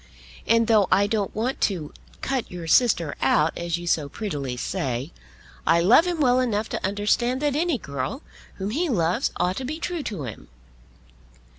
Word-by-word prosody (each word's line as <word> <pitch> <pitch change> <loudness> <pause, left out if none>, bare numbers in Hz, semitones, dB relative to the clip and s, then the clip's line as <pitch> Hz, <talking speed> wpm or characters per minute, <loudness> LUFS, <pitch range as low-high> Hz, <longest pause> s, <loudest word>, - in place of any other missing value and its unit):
And, 230 0 +4
though 215 -4 +4
I 200 - +5
don't 205 -2 -1
want 240 +5 -2
to 170 -7 -1 0.3
cut 265 -3 -2
your 175 -2 -7
sister 170 - +3
out, 150 +4 +3
as 170 0 -2
you 175 - -7
so 155 -4 0
prettily 140 - -4
say, 135 -2 -3 0.5
I 165 +2 +5
love 230 - +5
him 350 -2 -1
well 255 -3 +4
enough 225 -4 0
to - - -4
understand 210 +6 +1
that 290 -2 +1
any 325 -2 +1
girl 140 - -5 0.3
whom 195 +1 -4
he 325 +7 0
loves 175 -7 +1
ought 180 +1 0
to 265 - -3
be 295 +5 -4
true 340 0 -3
to 200 - -5
him." 115 -4 -8
205 Hz, 175 wpm, -24 LUFS, 165-250 Hz, 0.5 s, I